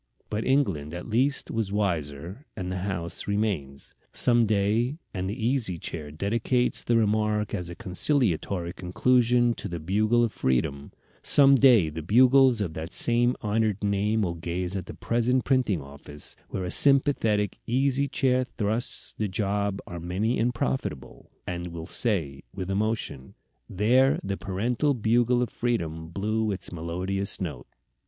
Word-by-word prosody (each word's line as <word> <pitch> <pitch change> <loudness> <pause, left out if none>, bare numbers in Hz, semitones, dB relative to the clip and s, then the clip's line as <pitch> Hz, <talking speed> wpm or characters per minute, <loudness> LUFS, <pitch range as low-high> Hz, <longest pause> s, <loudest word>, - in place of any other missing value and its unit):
But 105 +1 -1
England 95 - 0
at 90 - -7
least 130 +6 +1
was 110 -3 -2
wiser, 90 - -3
and 90 -2 -4
the 95 - -3
house 90 -3 -4
remains. 100 -10 -2 0.2
Some 120 -2 +3
day 110 +7 +1 0.2
and 95 -1 -3
the 110 +2 -4
Easy 120 -9 -1
Chair 80 -2 -6
dedicates 115 - 0
the 120 - +2
remark 105 -1 +1
as 90 -4 -3
a 85 - -7
conciliatory 95 - -1
conclusion 120 +6 +2
to - - -6
the 85 -1 -5
Bugle 110 +8 +2
of 115 - 0
Freedom 70 0 -1 0.3
some 140 -1 +5
day 125 -10 +6
the 80 +2 -6
Bugles 125 - +5
of 90 -6 -2
that 80 +2 -6
same 120 +1 +3
honored 105 -1 0
name 105 +2 +1
will 85 -3 -1
gaze 85 +2 -4
at 95 -2 -4
the - - -8
present 120 +2 0
printing 120 - +1
office, 70 +1 -7
where 95 - -4
a 90 - -4
sympathetic 125 -8 +3
Easy 135 +3 +1
Chair 130 -2 +1
trusts 110 +4 -2
the 105 - 0
jobs 100 0 -1
are 85 - -7
many 95 +8 -1
and 120 +2 +2
profitable, 120 - -4 0.2
and 85 -1 -4
will 85 -1 -7
say, 85 - 0
with 95 -1 -4
emotion, 100 - -2 0.3
"There 125 +8 +3
the 100 0 -2
parental 120 +10 -1
Bugle 120 +2 +2
of 120 - -4
Freedom 80 -10 -2
blew 110 +5 -1
its 95 - -5
melodious 90 +4 -2
note." 75 -9 -5
105 Hz, 150 wpm, -26 LUFS, 90-120 Hz, 0.3 s, day